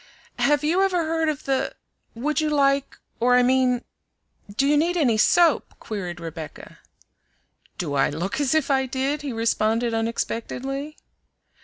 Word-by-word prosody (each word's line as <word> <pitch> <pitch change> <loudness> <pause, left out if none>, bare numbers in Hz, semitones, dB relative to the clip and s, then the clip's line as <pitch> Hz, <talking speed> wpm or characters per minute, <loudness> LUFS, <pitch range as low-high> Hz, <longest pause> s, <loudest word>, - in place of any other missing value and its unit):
"Have 295 +1 +2
you 335 +5 +2
ever 365 -4 +1
heard 325 0 0
of 300 -3 -3
the 270 -1 -1 0.4
would 300 +7 -1
you 310 - 0
like, 275 -2 +1 0.2
or 245 +1 +4
I 250 - +5
mean 250 -1 +2 0.7
do 275 - +3
you 290 +1 +4
need 340 +4 +2
any 260 -9 +3
soap?" 335 +8 +3
queried 180 -5 -5
Rebecca. 165 -2 -9 1.0
"Do 155 -5 -3
I 135 -1 +2
look 180 - -3
as 285 +1 +1
if 310 -2 +1
I 265 -1 +2
did?" 270 +3 -1
he 285 -2 -4
responded 230 0 0
unexpectedly. 250 +5 -3
265 Hz, 150 wpm, -24 LUFS, 230-300 Hz, 1.0 s, I